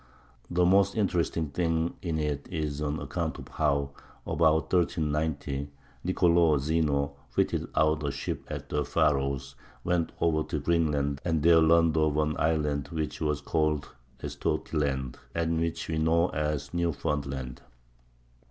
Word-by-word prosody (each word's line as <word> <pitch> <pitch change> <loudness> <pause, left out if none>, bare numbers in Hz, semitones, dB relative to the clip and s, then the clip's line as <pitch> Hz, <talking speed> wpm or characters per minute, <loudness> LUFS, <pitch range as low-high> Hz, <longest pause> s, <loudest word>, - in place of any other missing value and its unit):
The 90 0 +2
most 100 +2 +4
interesting 85 -6 0
thing 80 +1 0
in 85 -3 -2
it 75 -2 -2
is 75 -3 -3
an 75 0 -1
account - - -3
of - - -9
how, 70 -1 0 0.3
about 80 0 +2
1390, 75 -5 0 0.3
Nicolò 85 -3 +4
Zeno 70 -1 0 0.2
fitted - - 0
out 75 -1 +2
a 70 - 0
ship 70 0 -4
at - - -6
the 75 - 0
Faroes, 70 -3 0 0.3
went 85 -2 0
over 80 -2 +2
to - - -1
Greenland 75 -4 +1
and 80 -4 0
there 85 0 +7
learned 80 0 +4
of 75 -1 +2
an 75 0 +1
island 75 -3 +1
which 80 -1 -4
was 75 -2 0
called 75 -1 0 0.3
Estotiland, 65 -5 -2 0.2
and 85 -1 0
which 85 0 -2
we 80 -1 -1
know 85 +2 +3
as 75 -1 -2
Newfoundland. 70 -6 -2
75 Hz, 135 wpm, -28 LUFS, 70-85 Hz, 0.3 s, there